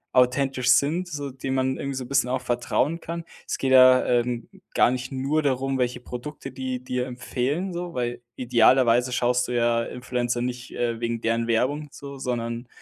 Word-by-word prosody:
authentisch 125 0 +2
sind, 160 +8 +1
so 145 -4 -5
die 135 +1 -5
man 130 0 0
irgendwie 140 0 -4
so 130 - -3
'n - - -11
bisschen 135 -2 +2
auch 130 0 -1
vertrauen 125 +6 0
kann. 170 0 -5 0.2
Es - - -2
geht 135 - 0
ja, 130 0 +8
ähm, 120 -1 0 0.3
gar - - +5
nicht 130 0 -4
nur 140 +4 0
darum, 135 -1 0
welche 125 0 0
Produkte 135 +3 -7
die 130 -1 -4
dir 125 0 -2
empfehlen, 130 +8 -2
so, 175 0 -5
weil 120 -1 -2
idealerweise 125 0 +4
schaust 125 0 +1
du - - -5
ja 120 -1 +2
Influencer 125 0 -2
nicht, 125 0 -4
äh, 115 -1 -1
wegen 115 -1 -2
deren 115 0 0
Werbung 135 +6 0
so, 140 0 -9
sondern 120 -1 -3
125 Hz, 185 wpm, -25 LUFS, 120-135 Hz, 0.3 s, ja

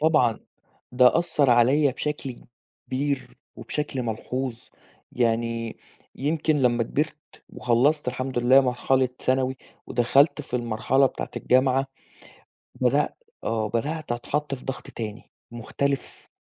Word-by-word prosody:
طبعًا 150 -8 +3 0.5
ده 125 +3 +5
أثّر 160 -6 +2
عليّا 130 +5 +4
بشكل 135 -1 -4 0.5
كبير 140 +1 -2 0.2
وبشكل 140 -3 -3
ملحوظ، 120 +2 -3 0.5
يعني 115 -1 -1 0.4
يمكن 155 +2 0
لمّا 120 -1 +3
كبرت 150 +7 -1 0.3
وخلّصت 130 +4 +1
الحمد 130 +1 -3
لله 125 +3 +6
مرحلة 130 0 +1
ثانوي 130 0 0 0.3
ودخلت 140 +5 +3
في 125 - -3
المرحلة 120 +3 +2
بتاعة - - -5
الجامعة 130 +1 +2 0.9
بدأ 130 +4 +2 0.3
آه 110 -1 -1
بدأت 145 +6 -2
أتحط 140 +4 -2
في 130 - -11
ضغط 135 - -5
تاني 110 -1 -7 0.2
مختلف. 135 +4 -3
130 Hz, 110 wpm, -25 LUFS, 120-140 Hz, 0.9 s, لله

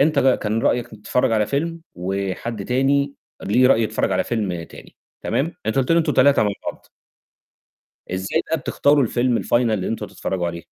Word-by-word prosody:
أنت 150 +1 +3
ك 135 -2 +4
كان 110 +1 -1
رأيك 120 -1 +1
تتفرج 110 +2 -1
على 105 -2 +2
فيلم، 165 +7 -2
وحد 95 +3 -3
تاني 140 +2 +1 0.3
ليه 125 +6 +3
رأي 115 -3 +4
يتفرج 110 - 0
على - - +1
فيلم 95 -7 -2
تاني، - - -14 0.3
تمام؟ 160 +5 -1
أنت 110 +5 0
قُلت 135 +5 +2
لي 170 - +5
أنتم 155 -3 +1
3 140 -2 +5
مع 105 -1 +1 0.2
بعض. - - -23 1.3
إزاي 95 +1 -1
بقى 160 - 0
بتختاروا 145 0 +2
الفيلم 120 +1 +1
الfinal - - -6
اللي 110 -6 +1
أنتم 115 - -3
هتتفرجوا 90 -2 -3
عليه؟ 85 0 -6
120 Hz, 180 wpm, -21 LUFS, 100-140 Hz, 1.3 s, لي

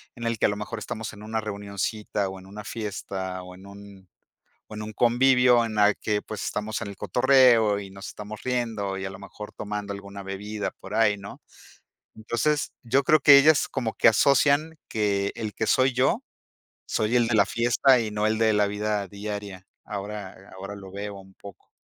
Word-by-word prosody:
en 120 - -9
el 115 -1 -1
que - - +3
a - - 0
lo 105 - -2
mejor 105 +2 -5
estamos 110 +2 -5
en 105 0 -12
una 110 +1 -2
reunioncita, 100 0 -3
o 95 0 -8
en 95 - -15
una 105 +2 -9
fiesta, 95 -4 -5
o 90 0 -11
en 95 +1 -15
un 100 -2 -13 0.6
o 110 - -8
en 105 - -6
un 110 - -6
convivio 125 +1 +4
en 110 -1 -5
la 105 0 +5
que, 105 -1 -1
pues, 105 -3 -6
estamos 105 +1 -3
en 110 - -4
el 100 - -10
cotorreo 125 -5 +4
y 100 -1 -8
nos 95 +1 -9
estamos 105 +1 -9
riendo, 115 -6 -2
y 95 - -5
a - - -3
lo 95 - -9
mejor 105 +1 -10
tomando 105 -1 -5
alguna 100 0 -9
bebida 105 +2 -4
por 95 - -12
ahí, 110 -2 +4
¿no? 100 0 -10 0.8
Entonces, 120 +7 -1
yo 130 +4 +2
creo 155 +3 +5
que 140 0 +9
ellas 150 +1 +5
como 120 -5 -3
que - - +2
asocian 140 +7 +3
que 100 -2 0
el 110 -3 -5
que 110 - -2
soy 130 +3 +3
yo, 130 +2 +2 0.6
soy 110 +3 0
el 120 -1 +3
de 115 - 0
la 100 - +6
fiesta 120 +3 +3
y 110 -2 -3
no 105 0 0
el 110 0 0
de 110 -1 +3
la 105 0 +3
vida 105 -1 -2
diaria. 100 -2 -7 0.2
Ahora 100 -1 -6 0.2
ahora 100 +2 -7
lo 95 -2 -11
veo 100 +1 -6
un 95 0 -15
poco. 100 -1 -14
105 Hz, 205 wpm, -25 LUFS, 100-115 Hz, 0.8 s, que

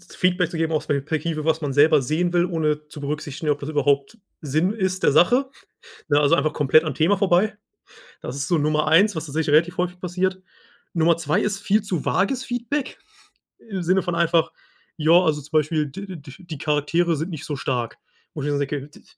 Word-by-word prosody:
z 185 - -16
Feedback 180 -1 +1
zu 170 - -5
geben, 160 0 -1
aus 155 - -1
der 140 -1 0
Perspektive, 155 +1 -3
was 160 0 +1
man 145 -3 -3
selber 150 +1 +5
sehen 165 +7 0
will, 175 0 +3
ohne 155 -3 -1
zu 150 - -10
berücksichtigen, 150 +1 -3
ob 145 - 0
das 145 - -7
überhaupt 145 +5 0 0.3
Sinn 155 +7 0
ist 190 -3 -2
der - - +4
Sache, 255 +9 +3 0.6
ne, 145 0 +3
also, 145 - +4
einfach 150 +2 +1
komplett 150 +2 +3
am 155 -4 -3
Thema 170 +6 +2
vorbei. 200 +2 +2 0.7
Das 135 - -6
ist 140 +5 -3
so 170 -3 +2
Nummer 155 +1 +1
1, 190 +6 +4
was 160 - -4
tatsächlich 150 0 -1
relativ 165 +4 +3
häufig 180 0 -2
passiert. 185 +1 -2 0.5
Nummer 165 0 +3
2 155 -2 0
ist 200 -1 -1
viel 205 +1 +1
zu 180 -7 -3
wages 255 +7 0
Feedback 245 +3 -3 0.6
im 195 -5 -6
Sinne 185 +3 +2
von 175 -1 -3
einfach 170 -1 +2 0.5
ja, 155 +2 +2
also, 160 -4 +4
zum 145 - -15
Beispiel, 155 0 +1
d 190 +6 -8
d 140 -2 -12
die 170 -5 -8
Charaktere 160 +4 0
sind 160 +5 -4
nicht 155 -3 -7
so 150 - -4
stark, 125 -3 -3 0.4
wo 150 - -5
ich 145 - -2
tatsächlich 140 0 -2
sage: - - -17
160 Hz, 205 wpm, -22 LUFS, 150-180 Hz, 0.7 s, selber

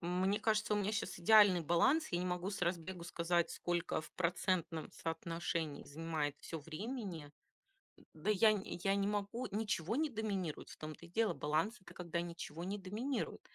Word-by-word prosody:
Мне 185 +4 +1
кажется, 215 -1 +2
у - - +2
меня 205 0 +1
щас 205 - -2
идеальный 200 0 +7
баланс. 255 - +3
Я 175 - 0
не 180 - -1
могу 180 +2 -1
с 200 - -4
разбегу 175 0 -1
сказать, 170 0 +1
сколько 175 -2 -1
в 155 - -12
процентном 175 -2 0
соотношении 165 -2 -3
занимает 155 -1 -2
всё 165 - -5
времени. 170 - -5 0.8
Да, 160 +7 -3
я 215 +1 +6
нь 200 - -2 0.2
я 195 0 +3
не 200 0 +1
могу, 205 +4 -1
ничего 210 -1 0
не 310 +1 +2
доминирует. 200 - -3
В - - -10
том 155 0 -5
то - - -13
и 170 - -14
дело 220 +4 +2
баланс- 155 +9 0
это - - -13
когда 170 -1 -2
ничего 170 -1 -6
не 195 +3 -2
доминирует, 215 +8 -3
180 Hz, 175 wpm, -37 LUFS, 165-210 Hz, 0.8 s, идеальный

